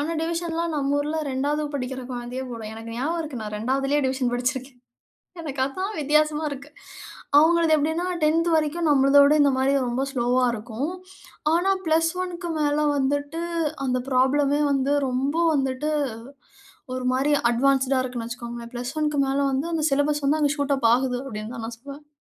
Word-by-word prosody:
ஆனா, 305 +3 -1
டிவிஷன்லாம் 335 0 -2
நம்ம 285 -1 0
ஊர்ல 300 +2 -2
2வது 285 +3 -1
படிக்கிற 260 -1 -3
குழந்தையே 245 +1 -5
போடும். 225 -2 -6
எனக்கு 225 +1 -8
ஞாபகம் 320 +7 -1
இருக்கு. 290 -7 -6
நான் 210 0 -5
2வதுலயே 270 +5 0
டிவிஷன் 260 -1 0
படிச்சிருக்கேன். 250 +1 -3 0.6
எனக்கு 285 -4 -6
அதான் 375 +10 -4
வித்தியாசமா 300 +1 +2
இருக்கு. 280 +1 -8 0.7
அவுங்களது 325 +1 +5
எப்பிடின்னா? 320 +4 0 0.2
10த் 325 +2 +3
வரைக்கும் 315 +2 0
நம்மளுத 275 0 +5
விட 285 +1 +5
இந்தமாரி 270 -1 +3 0.2
ரொம்ப 245 +2 -1
ஸ்லோவா 250 -1 +1
ஆ - - +2
இருக்கும். 235 +7 -4 0.6
ஆனா 355 +4 +2
+1க்கு 345 +2 0
மேல 300 0 +1
வந்துட்டு 285 +3 -1 0.4
அந்த 255 -1 0
ப்ராப்ளமே 280 +3 +2
வந்து 275 0 +1
ரொம்ப 260 +4 -1 0.2
வந்துட்டு 270 +1 -1 1.1
ஒருமாரி 255 +3 0 0.2
அட்வான்ஸ்ட்டுடா 265 +1 +2
இருக்குன்னு 245 -3 -5
வச்சிக்கோங்களேன். 235 0 -7
+1க்கு 285 +4 -1
மேல 270 +1 0
வந்து 270 +5 -1
அந்த 320 -2 0
சிலபஸ் 285 +1 +1
வந்து 305 +3 +2
அங்க 290 -1 +2
ஷூட் 285 -1 +1
அப் 235 -4 +3
ஆகுது 250 0 0
அப்பிடின்தான் 225 -1 -6
நான் 230 0 -7
சொல்வேன். 280 +3 -11
275 Hz, 150 wpm, -24 LUFS, 255-305 Hz, 1.1 s, அவுங்களது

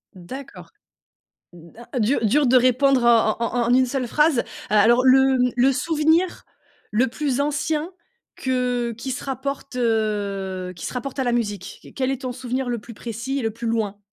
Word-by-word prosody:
D'accord. 260 +10 -10 0.8
D'a 175 +8 -14
dur, 235 +5 +2
dur 275 +6 +3
de 255 - +4
répondre 255 +1 +3
en 230 -2 +4
en 235 +1 -2
en - - -1
en 245 - +3
une 260 0 +5
seule 255 0 -2
phrase. 300 0 +2 0.3
A 210 - +4
alors 240 +4 +4
le, 265 0 +5
mmh, 250 0 +2
le 255 +2 +4
souvenir 320 +5 +1 0.5
le 235 +5 +2
plus 275 +1 -1
ancien 300 +3 -1 0.4
que 250 -2 -1
qui 260 +3 -5
se 255 - -5
rapporte, 275 0 -5
heu, 200 -5 -1
qui 170 - -7
se - - -5
rapporte 255 +2 -5
à - - +2
la 245 - 0
musique? 205 -6 -3
Q - - -15
quel 265 -1 -1
est 270 -1 -4
ton 255 -2 -3
souvenir 250 +1 -3
le 240 - -2
plus 230 +3 -11
précis 230 +5 -4
et - - -3
le 225 - 0
plus 230 +2 -6
loin? 215 -3 -1
250 Hz, 190 wpm, -22 LUFS, 225-270 Hz, 0.8 s, une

